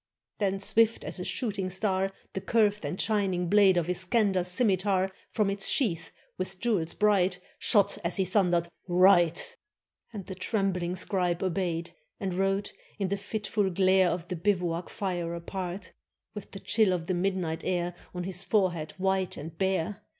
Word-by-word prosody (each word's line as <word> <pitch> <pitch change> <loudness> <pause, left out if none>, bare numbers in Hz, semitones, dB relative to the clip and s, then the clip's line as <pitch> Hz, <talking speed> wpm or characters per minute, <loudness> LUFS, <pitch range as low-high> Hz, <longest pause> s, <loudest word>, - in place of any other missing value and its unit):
Then 195 -2 0
swift 225 +3 +2
as - - -4
a - - -3
shooting 200 -4 -2
star 190 0 0 0.2
The 190 - -3
curved 210 -2 +2
and 180 - -4
shining 195 -5 +1
blade 200 -2 +5
Of 170 -2 +1
Iskander's 185 +1 +1
scimitar 190 -1 +1 0.2
From 210 -3 +1
its 200 0 +3
sheath, 165 - +1 0.3
with 185 0 -4
jewels 200 -8 0
bright, 195 -3 +2 0.2
Shot, 205 -4 +3
as 170 +3 -1
he 190 - +2
thundered: 180 -3 +2 0.2
"Write!" 175 -2 +4 0.5
And 205 -5 -7
the 190 - -6
trembling 185 -2 -1
scribe 180 -2 -1
obeyed, 175 -2 -1 0.3
And 195 -4 -2
wrote 195 +2 0 0.2
in 195 -3 -1
the 200 - 0
fitful 205 0 -2
glare 190 0 +4
Of 175 0 -3
the 180 - -3
bivouac 175 -2 -1
fire 175 -4 -3
apart, 180 +1 -5 0.4
With 210 - -8
the 195 - -9
chill 215 -3 +2
of 170 -2 -2
the 185 - -1
midnight 175 -3 -1
air 175 -1 -1 0.2
On 180 - -3
his 185 0 -1
forehead 180 -5 0
white 190 0 0
and 160 +3 -8
bare. 190 +1 -1
190 Hz, 160 wpm, -28 LUFS, 175-200 Hz, 0.5 s, blade